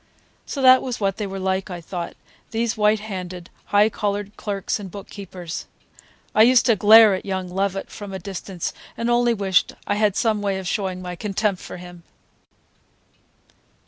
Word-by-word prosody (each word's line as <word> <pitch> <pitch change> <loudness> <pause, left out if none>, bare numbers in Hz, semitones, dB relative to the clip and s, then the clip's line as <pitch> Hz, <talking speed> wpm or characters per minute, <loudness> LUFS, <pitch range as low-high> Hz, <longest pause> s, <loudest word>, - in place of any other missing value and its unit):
So 275 - -3
that 255 0 +8
was 250 -3 -4
what 195 -2 0
they 210 -2 -3
were 195 0 -6
like, 190 +1 -1
I 180 -1 -5
thought, 170 +1 -6 0.3
these 230 +1 -1
white 210 -1 +3
handed, 185 -4 -7
high 205 +1 +4
collared 205 -1 -3
clerks 200 0 -3
and 195 -2 -7
bookkeepers! 185 -3 -8 0.7
I 215 - +5
used 245 +1 +6
to 230 - +4
glare 215 +1 +8
at 185 - -3
young 190 -2 -3
Lovett 195 +1 -2
from 205 -2 -8
a 190 - -4
distance 190 -1 -5 0.2
and 235 +1 0
only 240 -1 +3
wished 195 -3 +2
I - - 0
had 210 -2 +2
some 220 -3 +1
way 200 -1 0
of 190 -1 -5
showing 185 -1 -2
my 180 0 -5
contempt 200 0 -1
for - - -8
him. 175 -1 -11
200 Hz, 175 wpm, -22 LUFS, 185-215 Hz, 0.7 s, that